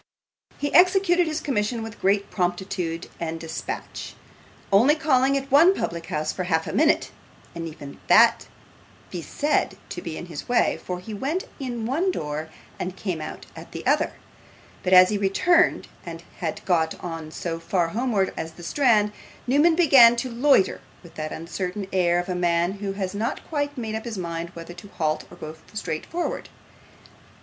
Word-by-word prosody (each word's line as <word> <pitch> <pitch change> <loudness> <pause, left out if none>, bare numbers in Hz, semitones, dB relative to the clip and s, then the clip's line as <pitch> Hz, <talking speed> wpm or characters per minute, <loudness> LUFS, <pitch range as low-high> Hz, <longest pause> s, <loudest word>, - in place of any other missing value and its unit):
He 290 0 -3
executed 360 -1 +5
his 310 0 -2
commission 230 -3 -1
with 225 0 -9
great 200 +1 +1
promptitude 175 -2 -2
and 165 -1 -3
dispatch, 160 0 -6 0.6
only 245 +10 +6
calling 275 -3 +2
at 275 0 -5
one 335 +7 +7
public 170 - -4
house 155 0 -2
for 185 - -3
half 160 -2 +1
a - - -5
minute, 310 +1 +2 0.4
and 165 -1 -5
even 145 -3 -10
that - - +5 0.6
might - - -27
be 175 - -4
said 295 - 0
to - - -5
be 165 -2 -6
in - - -6
his 165 +2 -8
way, 245 - +2
for 180 -1 -4
he 215 +4 -8
went 285 - -2 0.2
in 245 -4 -4
at - - -3
one 325 +10 +1
door 155 - -3 0.3
and 185 +1 -4
came 180 -6 -3
out - - -7
at - - -11
the - - -7
other; - - +2 0.7
but 180 - -2
as 185 0 +8
he 210 - 0
returned 335 - +3 0.2
and 165 -1 -8 0.2
had 160 -3 -4
got 165 -3 +1 0.4
so 165 0 -4
far 170 0 0
homewards 215 -2 0
as 160 0 -5
the 175 - -12
Strand, 215 -1 +3 0.3
Newman 295 +6 +4
began 270 -9 +7
to 245 +1 -3
loiter 240 -4 +3 0.2
with 170 - -14
the 155 0 -5
uncertain 180 +4 -4
air 175 -2 +3
of 175 +1 -1
a 185 - -1
man 175 0 +1
who 200 0 -4
has 195 -1 -3
not 215 +3 -3
quite 290 -2 -2
made 220 -3 -4
up 220 +1 -4
his 230 -3 -5
mind 170 -1 -4
whether 170 +1 -8
to 175 +3 -12
halt 155 -5 -2
or 175 - -13
go 155 -1 -7 0.2
straight 165 -7 -4
forwards. 345 +1 -3
195 Hz, 180 wpm, -24 LUFS, 170-265 Hz, 0.7 s, as